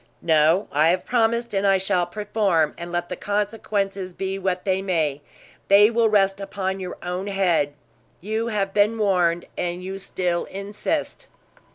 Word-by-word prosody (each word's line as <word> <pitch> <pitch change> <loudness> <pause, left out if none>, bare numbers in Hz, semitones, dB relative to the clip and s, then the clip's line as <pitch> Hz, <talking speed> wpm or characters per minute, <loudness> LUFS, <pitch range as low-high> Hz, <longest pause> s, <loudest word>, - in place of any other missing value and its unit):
"No, 160 +4 +3
I 155 +3 +3
have 180 +2 0
promised, 235 -1 +1
and 195 0 +1
I 195 0 +5
shall 185 -2 0
perform; 195 -5 0
and 170 0 -7
let 175 0 -2
the 180 - -3
consequences 200 -2 -2
be 195 0 -3
what 185 -1 -2
they 190 -1 +1
may, 160 -7 -1 0.5
they 205 +2 +6
will 230 -1 +3
rest 195 -1 +2
upon 195 -1 -3
your 180 -1 -6
own 180 +2 -3
head. 180 -7 +1 0.5
You 220 +4 -2
have 200 -3 -1
been 210 +2 +3
warned, 180 -5 +1
and 175 +1 -3
you 190 +1 -5
still 180 -2 -2
insist." 210 - -4
195 Hz, 160 wpm, -23 LUFS, 175-205 Hz, 0.5 s, they